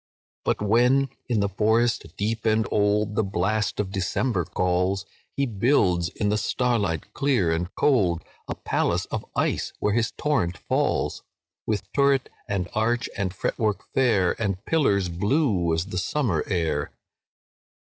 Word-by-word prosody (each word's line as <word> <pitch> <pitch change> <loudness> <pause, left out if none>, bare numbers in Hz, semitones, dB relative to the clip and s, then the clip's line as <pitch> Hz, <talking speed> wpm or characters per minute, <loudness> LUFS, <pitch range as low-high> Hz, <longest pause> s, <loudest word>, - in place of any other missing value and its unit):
"But - - 0
when, 125 +6 +3 0.2
in 115 -4 +2
the 100 - +2
forest 110 +4 +1
bare 110 +3 0 0.2
and 110 -1 +1
old, 105 0 +2
The 105 - +2
blast 100 +2 -1
of 100 -2 -1
December 95 0 0
calls, 90 +3 0 0.3
He 140 - +2
builds, 100 -7 +2
in 105 +1 -2
the 105 +1 +1
starlight 105 - -1
clear 125 -12 +1
and 85 +2 -2
cold, 95 - +2 0.2
A - - -3
palace - - 0
of - - -2
ice - - 0
where 105 - 0
his 115 0 +1
torrent 115 - -1
falls, - - -1 0.5
With 105 -2 -2
turret, 140 -1 +3 0.2
and 100 -4 -1
arch, 115 +2 0
and 100 -3 -1
fretwork 105 +2 -2
fair, 110 -9 +3
And 100 -3 -2
pillars 105 - +2
blue 100 - +1
as 80 +1 0
the 95 -2 -3
summer 95 - 0
air. 80 -6 -1
105 Hz, 145 wpm, -25 LUFS, 90-120 Hz, 0.5 s, when